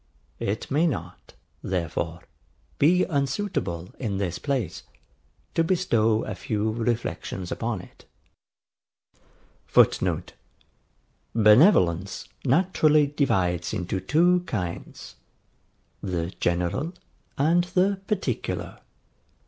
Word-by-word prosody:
It 105 +4 -3
may 155 +5 +3
not, 90 - -6 0.3
therefore, 85 -2 -3 0.6
be 180 +5 +5
unsuitable, 140 - -2
in 105 -6 -2
this 90 -3 -2
place, 130 - -2 0.7
to 165 - +2
bestow 115 - +2
a 105 - -4
few 105 +3 -2
reflections 110 -5 -3
upon 115 -5 -2
it. - - -17 1.6
[Footnote: - - +2 1.0
Benevolence 105 - +4 0.2
naturally 155 0 +4
divides 95 - 0
into 90 +1 -2
two 170 - +3
kinds, 90 -5 -5 0.8
the 90 -2 -3
GENERAL 90 - 0 0.4
and 170 +5 +3
the 190 +2 +1
PARTICULAR. 185 - -3
115 Hz, 85 wpm, -25 LUFS, -, 1.6 s, be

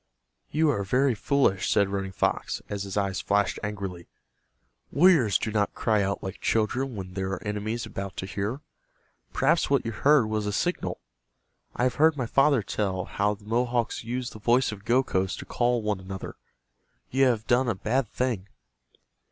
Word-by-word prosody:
"You 155 0 +2
are 100 -7 -1
very 130 +6 +2
foolish," 110 -4 +1
said 100 - +3
Running 95 -1 -3
Fox, 95 - -1
as 100 -1 -3
his 100 0 -4
eyes 100 -1 0
flashed 100 0 +1
angrily. 100 -5 -5 0.8
"Warriors 145 - +5
do 115 - -3
not 105 -1 0
cry 110 -2 +2
out 100 0 -2
like 95 +1 -6
children 120 +4 0
when 95 -2 -7
there 95 0 -2
are 95 - -5
enemies 105 +2 -3
about 100 -1 -6
to - - -3
hear. 105 +8 -3 0.7
Perhaps - - +2
what 140 -3 +2
you 115 - -2
heard 140 +3 +4
was 110 -1 -2
a - - 0
signal. 175 - -1 0.8
I - - 0
have 125 -1 +1
heard 160 -1 +5
my 125 - -1
father 135 0 +3
tell 95 -2 -2
how 105 +2 0
the 100 0 -19
Mohawks 120 +1 0
use 125 +2 -3
the 110 - -10
voice 120 +4 +2
of 105 -1 -10
Gokhos 110 -6 +1
to - - -8
call 120 -1 0
one 105 -2 -1
another. 95 +1 -7 0.8
You 135 +1 +4
have 115 -4 +1
done 125 +1 +2
a 110 - 0
bad 120 +6 0
thing." 120 -7 -2
110 Hz, 175 wpm, -27 LUFS, 100-125 Hz, 0.8 s, Warriors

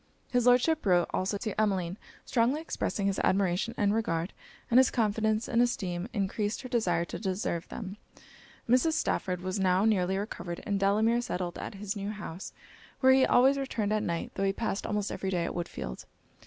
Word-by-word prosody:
His 245 -1 +2
Lordship 255 +6 +4
wrote 180 -3 +3
also 190 +2 0
to 215 0 -2
Emmeline, 190 -4 0 0.3
strongly 245 +4 +2
expressing 265 -10 -2
his 195 -1 0
admiration 195 +4 +1
and 205 -1 +2
regard, 170 -5 -1 0.4
and 245 - +7
his 260 - +5
confidence 220 -1 0
and 235 - +2
esteem 185 -6 -1
encreased 205 +3 -2
her 255 - -7
desire 175 -8 +1
to - - -6
deserve 190 -3 -2
them. 200 -3 -7 0.7
Mrs. 255 +7 +3
Stafford 180 - -1
was 185 +2 -3
now 190 +1 +3
nearly 190 -3 +2
recovered; 175 -4 -5
and 200 -2 0
Delamere 215 +4 +3
settled 180 -7 -4
at - - -6
his 200 +1 -4
new 200 0 -4
house, 205 -4 -7 0.5
where 260 -1 +6
he 265 0 +5
always 270 +3 +5
returned 220 -6 -1
at 215 - +1
night, 170 -3 -3
tho' 195 - -2
he 195 - +1
passed 215 -2 -2
almost 210 -2 -1
every 190 - -3
day 175 -3 0
at - - -3
Woodfield. 170 - -5
205 Hz, 180 wpm, -29 LUFS, 185-230 Hz, 0.7 s, and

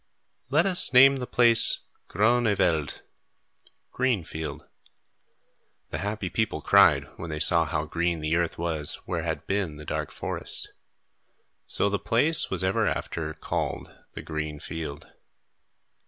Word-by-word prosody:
"Let 150 +5 +2
us 185 -7 +4
name 135 +2 +7
the 125 -2 -5
place 120 -2 +6 0.2
Groen 120 +3 +2
e' 105 - +2
veld" 80 -6 -1 0.9
(Green 125 -8 0
Field), 80 0 -7 1.3
the - - -4
happy 105 -1 -4
people 110 +4 -2
cried, - - +4
when 85 - -7
they 75 -1 -4
saw 85 +1 +3
how 80 -1 -3
green 85 +1 -2
the 80 +1 -1
earth 85 -1 -1
was 80 -3 -4
where - - -3
had - - -4
been 95 -6 -2
the 75 - -11
dark - - -4
forest. - - -6 1.0
So - - 0
the 100 0 -1
place 150 +8 +2
was 95 -1 -2
ever 95 +1 +1
after 80 -2 -4
called - - -4 0.2
the - - -7
Green 75 -1 -5
Field. 75 -3 -7
90 Hz, 140 wpm, -26 LUFS, 80-115 Hz, 1.3 s, name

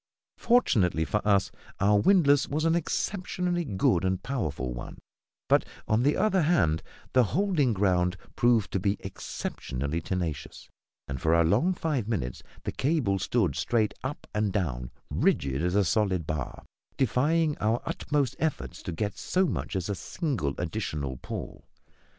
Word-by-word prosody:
Fortunately 95 - +3
for 105 - 0
us, 100 -2 +3 0.3
our 100 +1 +4
windlass 145 - +4
was 155 +3 -1
an 165 - +4
exceptionally 180 +1 -1
good 95 - +1
and 95 0 0
powerful 75 - -2
one; - - -8 0.5
but, - - +4 0.2
on 110 +2 +3
the 145 +4 +2
other 200 -4 +3
hand, 85 - +2 0.3
the 125 - +6
holding 155 - +1
ground 90 -3 +2 0.2
proved 120 -4 +3
to 95 - 0
be 100 +2 0
exceptionally 70 +6 -4
tenacious; 80 -5 -4 0.4
and, 65 -2 -5
for 80 +1 +3
a 85 - +5
long 110 - +3
five 145 -11 -1
minutes, 80 - -2 0.2
the - - -2
cable 130 -10 +1
stood - - +1
straight 110 -3 +1
up 135 +3 -5
and 105 -1 +1
down, 70 -12 -2 0.2
rigid 70 +1 +1
as 90 +2 0
a 100 -1 +4
solid 95 -4 +1
bar, 75 -4 -4 0.3
defying 150 +5 +2
our 110 +2 +1
utmost 140 -4 -1
efforts 100 - -2
to - - -5
get 105 +5 -3
so 185 +1 +1
much 160 - -3
as 95 -2 -1
a 100 - -1
single 115 - -2
additional 75 - -3
pawl. - - -7
105 Hz, 150 wpm, -28 LUFS, -, 0.5 s, the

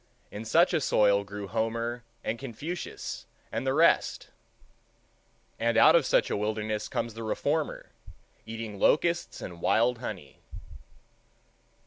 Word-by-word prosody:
In 105 +2 -7
such 170 +10 +4
a 160 - +2
soil 100 -5 +3
grew 100 0 -7
Homer 115 +2 -2 0.2
and 115 +1 -2
Confucius 140 +8 -6 0.2
and 135 - -3
the 130 - +2
rest, 165 +2 +3 1.3
and 115 0 +1
out 160 - +7
of 165 -6 +4
such - - +2
a - - +1
wilderness 110 0 -2
comes 115 - -3
the 115 - -8
reformer 145 +8 -2 0.5
eating 110 -2 -7
locusts 170 - +2
and 85 -2 -8
wild 120 +4 +2
honey. 95 - -7
115 Hz, 125 wpm, -28 LUFS, 105-135 Hz, 1.3 s, out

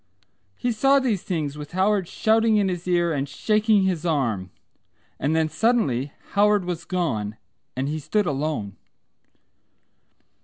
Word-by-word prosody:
He 245 - -1
saw 270 +5 +4
these 230 -8 0
things 150 -5 -3
with 150 +3 -9
Howard 190 0 +1
shouting 220 +2 +2
in 200 -2 +2
his 180 -1 -4
ear 175 -2 +2
and 140 -1 -2
shaking 210 +6 +2
his 185 -4 0
arm. 120 - -1 0.7
And 150 +3 0
then 160 -1 +2
suddenly 155 - +1 0.2
Howard 205 -1 +3
was 175 -2 -4
gone 115 - -2 0.4
and 130 +2 -2
he 155 +2 -2
stood 205 +8 0
alone. 145 - -2
175 Hz, 140 wpm, -24 LUFS, 145-210 Hz, 0.7 s, saw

